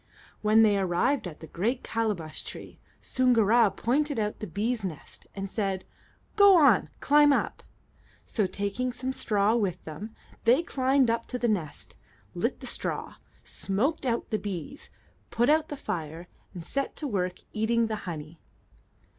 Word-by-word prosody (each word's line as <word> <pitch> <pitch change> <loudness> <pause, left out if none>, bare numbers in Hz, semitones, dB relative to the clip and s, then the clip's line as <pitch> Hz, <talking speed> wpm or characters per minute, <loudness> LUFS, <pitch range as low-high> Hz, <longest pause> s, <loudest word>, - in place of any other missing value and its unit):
When 215 +1 +5
they 205 -2 +4
arrived 190 +7 +1
at 160 -3 -10
the - - -7
great 230 +11 -2
calabash 210 -9 -2
tree, - - -9 0.2
Soongoora 235 -3 +4
pointed 285 +3 0
out 210 -1 -2
the 215 - -5
bees' 215 +6 -1
nest 170 -6 -7
and 195 0 -4
said, 195 -2 -2 0.5
"Go 405 -3 +8
on; 275 - +5
climb 295 0 +5
up." - - 0 0.6
So, 210 -5 0
taking 205 +7 -2
some 255 +1 -4
straw 210 -3 +1
with 190 -6 -1
them, 200 +8 -8 0.3
they 250 +8 +4
climbed 265 -4 +2
up 230 0 -2
to 250 - -3
the 240 0 0
nest, 175 -10 -3 0.4
lit - - -2
the - - -7
straw, - - -4 0.3
smoked 240 +13 -2
out 235 -1 -1
the 215 - 0
bees, 200 - -6 0.4
put 240 +5 +2
out 315 0 +2
the 290 - -5
fire, 165 - -5 0.3
and 170 -2 -7
set 275 +8 -3
to 300 - -4
work 185 -6 -1 0.2
eating 230 +2 +2
the 220 -1 -2
honey. 155 0 -7
220 Hz, 155 wpm, -28 LUFS, 190-255 Hz, 0.6 s, Go